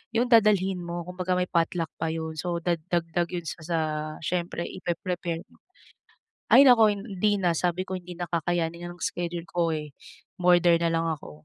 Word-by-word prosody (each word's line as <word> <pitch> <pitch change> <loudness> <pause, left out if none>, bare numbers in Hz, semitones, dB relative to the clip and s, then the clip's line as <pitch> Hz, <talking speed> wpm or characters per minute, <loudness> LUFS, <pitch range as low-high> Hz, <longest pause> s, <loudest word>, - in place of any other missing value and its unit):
yung 240 +2 +2
dadalhin 200 -4 +4
mo, 170 0 -5
kumbaga 180 0 -2
may 180 0 -1
potluck 165 -1 0
pa - - -1
yun, 160 0 -4
so 175 0 -2
dagdag 170 0 0 0.3
yun 175 -2 -3
sa 160 - -6
sa 170 -1 -1 0.5
syempre 175 0 -2
ipre-prepare 175 -1 -4
mo. - - -23 0.9
Ay 270 - +9
naku! 225 -4 +6
Hindi 205 0 0
na, 175 -2 +2
sabi 180 +1 0
ko, 190 - -6
"Hindi 180 0 -9
na 175 - -3
kakayanin 170 0 -1
ng - - -22
schedule 175 -3 -3
ko 170 -1 0
eh". 150 -2 -5 0.5
Umorder 175 -1 +5
nalang 165 0 +1
ako. 145 - -12
175 Hz, 170 wpm, -26 LUFS, 170-185 Hz, 0.9 s, Ay